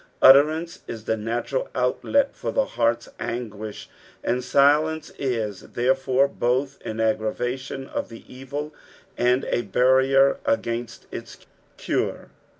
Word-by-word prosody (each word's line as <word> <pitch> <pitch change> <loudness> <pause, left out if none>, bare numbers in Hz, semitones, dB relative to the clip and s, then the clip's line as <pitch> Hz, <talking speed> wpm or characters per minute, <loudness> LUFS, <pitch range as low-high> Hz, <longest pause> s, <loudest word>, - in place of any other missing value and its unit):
Utterance 155 +5 +5
is 115 -2 -6
the 110 - 0
natural 115 +4 -2
outlet 265 - +1
for - - -3
the 275 - +2
heart's 115 0 0
anguish, 110 -3 -5 0.4
and 125 +1 0
silence 155 +4 +3
is, 115 -7 -2
therefore, 130 +2 +2
both 135 +2 -1
au 110 0 -4
aggravation 125 +4 -1
of - - -4
the 115 - -11
evil 145 +4 -6 0.4
and 125 +2 +2
a - - 0
barrier 130 +5 +3
against 120 - -2
its - - -9 0.3
cure. - - -2
130 Hz, 120 wpm, -24 LUFS, 115-140 Hz, 0.4 s, Utterance